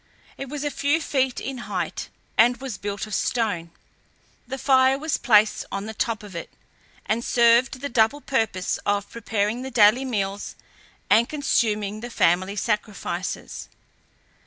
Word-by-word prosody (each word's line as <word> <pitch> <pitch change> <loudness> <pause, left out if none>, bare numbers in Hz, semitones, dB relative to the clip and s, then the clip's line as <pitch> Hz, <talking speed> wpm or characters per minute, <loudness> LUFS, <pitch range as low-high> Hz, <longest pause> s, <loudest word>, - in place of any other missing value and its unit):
It 275 - -7
was 295 0 -4
a 290 - -1
few 285 +4 +1
feet 265 -5 0
in 265 -2 -5
height 180 -5 -3 0.3
and 240 +2 +5
was 260 -4 -6
built 200 0 -4
of 215 - -9
stone; 200 -7 -1 0.8
the 265 +2 -4
fire 265 0 +4
was 305 +1 -1
placed 215 -3 +4
on 195 +1 -3
the 220 - -6
top 220 -1 -2
of 200 -4 -11
it, 170 - -6 0.6
and 230 +2 0
served 240 +2 +3
the 285 - -2
double 240 +1 +2
purpose 220 -10 -1
of 205 0 -1
preparing 220 0 -1
the 265 - -5
daily 230 +1 +5
meals, 200 -5 -3 0.6
and 230 +2 +5
consuming 215 -8 0
the 240 +2 -7
family 185 -2 +2
sacrifices. 210 -4 -3
225 Hz, 150 wpm, -24 LUFS, 205-260 Hz, 0.8 s, and